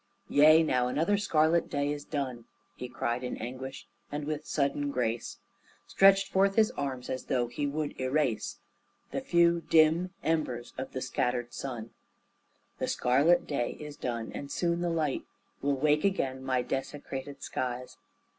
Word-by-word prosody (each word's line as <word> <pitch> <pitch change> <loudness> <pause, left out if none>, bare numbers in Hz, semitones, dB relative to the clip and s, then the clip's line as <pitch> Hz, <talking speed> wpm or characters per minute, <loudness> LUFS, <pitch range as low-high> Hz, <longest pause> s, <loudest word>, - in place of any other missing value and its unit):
"Yea, 155 +2 +7
now 125 -5 +2
another 160 +10 +1
scarlet 170 -4 +2
day 145 0 0
is 145 -1 -4
done!" 130 -6 -4 0.3
He 125 - -6
cried 120 +1 -2
in 125 - -3
anguish, 130 +3 -6 0.3
and 145 0 -3
with 155 0 -4
sudden 145 0 0
grace 120 -3 -2 0.5
Stretched 195 0 +5
forth 195 +1 +3
His 220 -1 +4
arms, 130 -3 -4
as 130 - -4
though 125 -2 +1
He 130 +5 -3
would 145 -1 -3
erase 130 -3 0 0.5
The - - -2
few, 170 0 +3
dim 165 +3 +4
embers 140 -7 -1
of 130 - -6
the 130 - -3
scattered 125 -1 -1
sun. 120 -4 -5 0.9
"The - - -1
scarlet 145 +8 +3
day 130 -5 -1
is 150 -1 -8
done, 115 -2 -4
and 140 - -6
soon 170 -1 0
the 175 - 0
light 155 -4 0 0.4
Will 140 0 +1
wake 150 +2 +2
again 135 -10 0
my 130 -2 +1
desecrated 135 +1 -5
skies. 125 0 -4
140 Hz, 155 wpm, -30 LUFS, 125-155 Hz, 0.9 s, Yea